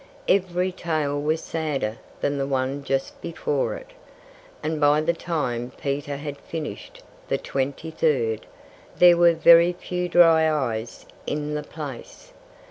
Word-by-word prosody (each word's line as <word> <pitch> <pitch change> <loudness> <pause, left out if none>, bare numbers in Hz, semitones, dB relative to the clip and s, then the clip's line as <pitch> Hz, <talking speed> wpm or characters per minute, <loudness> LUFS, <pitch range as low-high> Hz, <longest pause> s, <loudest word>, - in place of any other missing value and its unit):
Every 185 -1 +1
tale 155 -5 -2
was 155 +2 0
sadder 145 -9 -2 0.2
than 140 0 0
the 135 - -1
one 135 +1 -1
just 135 -1 -2
before 145 -4 -2
it. - - -11 0.7
And 155 -1 -2
by 145 +1 +5
the 165 +2 +1
time 125 -8 -3
Peter 140 0 -3
had 145 0 -6
finished 335 - -7 0.2
the - - 0
twenty 140 +4 -3
third, 120 -9 0 0.5
there 175 -1 +8
were 170 0 +5
very 170 +2 +7
few 180 0 -4
dry 165 -2 +5
eyes 120 -6 -3 0.2
in 150 0 -2
the 150 - -2
place. 145 -4 -9
150 Hz, 135 wpm, -24 LUFS, 140-170 Hz, 0.7 s, there